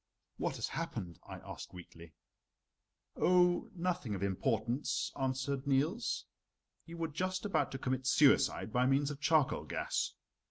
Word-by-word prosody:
"What -, -, -1 dB
has -, -, -3 dB
happened?" 85 Hz, -3 st, -4 dB
I -, -, -7 dB
asked -, -, -9 dB
weakly. 85 Hz, -2 st, -12 dB, 1.0 s
"Oh, 180 Hz, -1 st, +3 dB
nothing 170 Hz, -, -1 dB
of 95 Hz, -, -4 dB
importance," 115 Hz, +6 st, 0 dB
answered 135 Hz, +1 st, -1 dB
Niels. 150 Hz, -, +1 dB, 0.6 s
"You 170 Hz, 0 st, -8 dB
were 165 Hz, -1 st, -1 dB
just 185 Hz, +5 st, -2 dB
about 205 Hz, -, +1 dB
to -, -, -2 dB
commit 130 Hz, 0 st, -2 dB
suicide 135 Hz, -5 st, +4 dB
by 125 Hz, +1 st, +3 dB
means 140 Hz, +2 st, +2 dB
of 145 Hz, 0 st, -8 dB
charcoal 155 Hz, -2 st, +3 dB
gas. -, -, -1 dB
135 Hz, 135 wpm, -34 LUFS, 125-165 Hz, 1.0 s, suicide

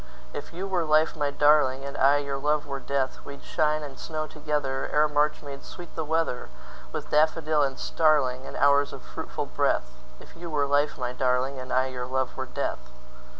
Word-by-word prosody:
If -, -, -6 dB
you 180 Hz, +3 st, -5 dB
were 185 Hz, -3 st, 0 dB
life, 155 Hz, 0 st, +3 dB
my 145 Hz, -2 st, 0 dB
darling, 140 Hz, -2 st, +4 dB
And 140 Hz, +1 st, -6 dB
I 140 Hz, +2 st, +5 dB
your 140 Hz, -1 st, -3 dB
love 150 Hz, +1 st, +1 dB
were 140 Hz, -1 st, -4 dB
death, 135 Hz, 0 st, -1 dB
We'd 140 Hz, 0 st, -10 dB
shine 155 Hz, 0 st, +1 dB
and 140 Hz, -3 st, -8 dB
snow 155 Hz, -1 st, -3 dB
togetherEre 150 Hz, -1 st, 0 dB
March 150 Hz, +1 st, +1 dB
made 140 Hz, -1 st, -8 dB
sweet 175 Hz, -2 st, -11 dB
the 160 Hz, -, -2 dB
weatherWith 90 Hz, -, -4 dB
daffodil 155 Hz, 0 st, +3 dB
and 135 Hz, -2 st, 0 dB
starlingAnd 135 Hz, -5 st, +1 dB
hours 140 Hz, 0 st, +4 dB
of -, -, -9 dB
fruitful -, -, -5 dB
breath; -, -, 0 dB, 0.3 s
If -, -, -15 dB
you 170 Hz, 0 st, -7 dB
were 145 Hz, -2 st, +1 dB
life, 145 Hz, +1 st, +1 dB
my 125 Hz, -1 st, -3 dB
darling, 130 Hz, +1 st, 0 dB
And 130 Hz, 0 st, -7 dB
I 130 Hz, +1 st, +3 dB
your 125 Hz, -1 st, -4 dB
love 130 Hz, 0 st, -1 dB
were -, -, -4 dB
death. -, -, -2 dB
145 Hz, 185 wpm, -27 LUFS, 130-150 Hz, 0.3 s, I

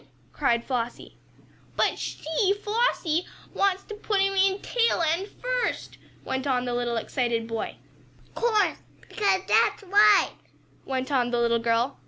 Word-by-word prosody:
cried 235 Hz, -5 st, +1 dB
Flossie. 245 Hz, -2 st, -4 dB, 0.6 s
"But -, -, +1 dB
she -, -, -6 dB
she 375 Hz, +6 st, +1 dB
Flossie 415 Hz, -6 st, 0 dB, 0.3 s
wants 390 Hz, -1 st, +1 dB
to 425 Hz, -, -9 dB
put 420 Hz, -1 st, -1 dB
him 390 Hz, 0 st, +2 dB
in, 390 Hz, 0 st, +2 dB
tail 465 Hz, -5 st, +1 dB
end 335 Hz, +5 st, 0 dB
first!" -, -, -3 dB, 0.3 s
went 265 Hz, +1 st, -2 dB
on 250 Hz, -2 st, +1 dB
the 245 Hz, -1 st, -2 dB, 0.2 s
excited 235 Hz, 0 st, -1 dB
little 225 Hz, 0 st, -5 dB
boy. 225 Hz, -, -4 dB, 0.6 s
"Course 445 Hz, -3 st, +1 dB, 0.3 s
'cause 395 Hz, -4 st, +1 dB
that's -, -, +3 dB
right!" 410 Hz, +2 st, +5 dB, 0.5 s
went 260 Hz, 0 st, -3 dB
on 250 Hz, -3 st, +2 dB
the 240 Hz, -, 0 dB
little 235 Hz, 0 st, +2 dB
girl. 230 Hz, +3 st, 0 dB
330 Hz, 145 wpm, -26 LUFS, 245-410 Hz, 0.6 s, right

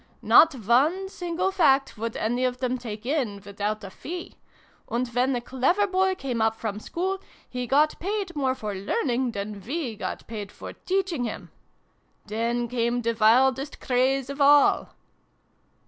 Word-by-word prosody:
Not 320 Hz, -3 st, +7 dB
one 275 Hz, -, +2 dB
single 360 Hz, 0 st, -2 dB
fact 275 Hz, -8 st, +3 dB
would 225 Hz, +1 st, -4 dB
any 240 Hz, +3 st, 0 dB
of 250 Hz, -1 st, 0 dB
them 255 Hz, 0 st, -1 dB
take 220 Hz, -2 st, -7 dB
in, 250 Hz, -8 st, -1 dB
without 205 Hz, +1 st, -3 dB
a 195 Hz, -, -8 dB
fee! 345 Hz, -, -7 dB, 0.6 s
And 245 Hz, +2 st, -1 dB
when 250 Hz, +2 st, +1 dB
a 240 Hz, -, -2 dB
clever 265 Hz, +12 st, +1 dB
boy 380 Hz, -1 st, +1 dB
came 255 Hz, -9 st, -3 dB
up 220 Hz, 0 st, +2 dB
from 215 Hz, -2 st, -4 dB
school, 375 Hz, -, -3 dB, 0.3 s
he 250 Hz, -1 st, -4 dB
got 300 Hz, +4 st, +3 dB
paid 390 Hz, -1 st, -3 dB
more 265 Hz, -3 st, 0 dB
for 210 Hz, -4 st, -5 dB
learning 245 Hz, -, -1 dB
than 200 Hz, 0 st, -5 dB
we 260 Hz, -, -3 dB
got -, -, -5 dB
paid 210 Hz, -3 st, -6 dB
for -, -, -9 dB
teaching 370 Hz, -8 st, -1 dB
him! -, -, -6 dB, 0.7 s
Then 235 Hz, +3 st, -1 dB
came 240 Hz, 0 st, -1 dB
the 230 Hz, 0 st, +1 dB
wildest 260 Hz, +5 st, +3 dB
craze 265 Hz, +1 st, +1 dB
of 280 Hz, +1 st, -5 dB
all." 285 Hz, 0 st, +5 dB
255 Hz, 160 wpm, -26 LUFS, 230-305 Hz, 0.7 s, Not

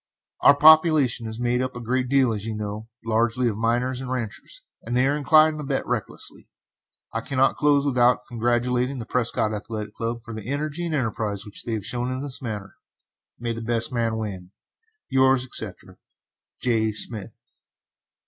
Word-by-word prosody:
Our 140 Hz, -, +6 dB
population 155 Hz, -6 st, +6 dB
is 110 Hz, +1 st, -7 dB
made 125 Hz, +1 st, +1 dB
up 130 Hz, -1 st, -3 dB
a -, -, -5 dB
great 125 Hz, +2 st, -1 dB
deal, 135 Hz, -4 st, +3 dB
as 105 Hz, -2 st, -4 dB
you 110 Hz, -1 st, -3 dB
know, 105 Hz, +1 st, -5 dB, 0.2 s
largely 115 Hz, +2 st, +1 dB
of 110 Hz, -, -1 dB
miners 120 Hz, +3 st, 0 dB
and 130 Hz, -, -6 dB
ranchers, 130 Hz, -, -5 dB, 0.2 s
and 120 Hz, +2 st, -2 dB
they 125 Hz, -, +4 dB
are 140 Hz, +2 st, +2 dB
inclined 155 Hz, +1 st, +4 dB
to -, -, -4 dB
bet 135 Hz, -1 st, -2 dB
recklessly. -, -, -5 dB, 0.6 s
I -, -, -1 dB
cannot 135 Hz, 0 st, +1 dB
close 145 Hz, -1 st, +3 dB
without 125 Hz, -5 st, +3 dB
congratulating 120 Hz, +2 st, 0 dB
the 115 Hz, -, -5 dB
Prescott 115 Hz, -2 st, 0 dB
Athletic 105 Hz, 0 st, -5 dB
Club 115 Hz, 0 st, -4 dB
for 115 Hz, -1 st, -8 dB
the 110 Hz, +1 st, -7 dB
energy 150 Hz, +4 st, -2 dB
and 160 Hz, -, -1 dB
enterprise 110 Hz, -6 st, -2 dB, 0.2 s
they 115 Hz, -, -1 dB
have 105 Hz, -3 st, -3 dB
shown 125 Hz, +2 st, -2 dB
in 130 Hz, +1 st, -3 dB
this 140 Hz, -1 st, -3 dB
matter. 105 Hz, -5 st, -6 dB, 0.6 s
May 120 Hz, 0 st, -3 dB
the 115 Hz, -, -6 dB
best 115 Hz, +1 st, 0 dB
man 115 Hz, -2 st, 0 dB
win! 95 Hz, -5 st, -5 dB, 0.6 s
Yours, 130 Hz, -1 st, +3 dB
etc., 110 Hz, -6 st, -7 dB, 0.6 s
J. 110 Hz, -3 st, +1 dB
SMITH. 105 Hz, -1 st, -3 dB
120 Hz, 170 wpm, -24 LUFS, 110-130 Hz, 0.6 s, Our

